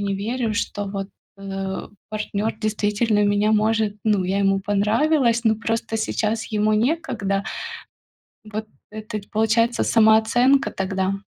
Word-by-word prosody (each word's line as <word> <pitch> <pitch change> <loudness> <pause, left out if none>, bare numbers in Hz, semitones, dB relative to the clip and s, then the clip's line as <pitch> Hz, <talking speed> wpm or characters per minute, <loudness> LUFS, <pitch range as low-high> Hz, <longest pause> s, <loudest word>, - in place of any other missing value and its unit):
не 200 -1 -1
верю, 225 +2 -2
что 205 -1 -2
вот, 195 -1 -4 0.3
э, 195 -1 -5 0.2
партнёр 215 0 -2
действительно 210 0 +1
меня 205 +1 +2
может, 215 -1 +2
ну, 205 -4 +2
я 190 +2 0
ему 195 0 +3
понравилась, 230 +5 +2
но 220 -1 +4
просто 225 0 -2
сейчас 220 0 -1
ему 215 0 +2
некогда. 215 -6 0 1.0
Вот 215 0 -5 0.3
это 215 0 -5
получается 225 +2 +2
самооценка 230 +5 +4
тогда. 190 0 -2
215 Hz, 120 wpm, -22 LUFS, 200-225 Hz, 1.0 s, но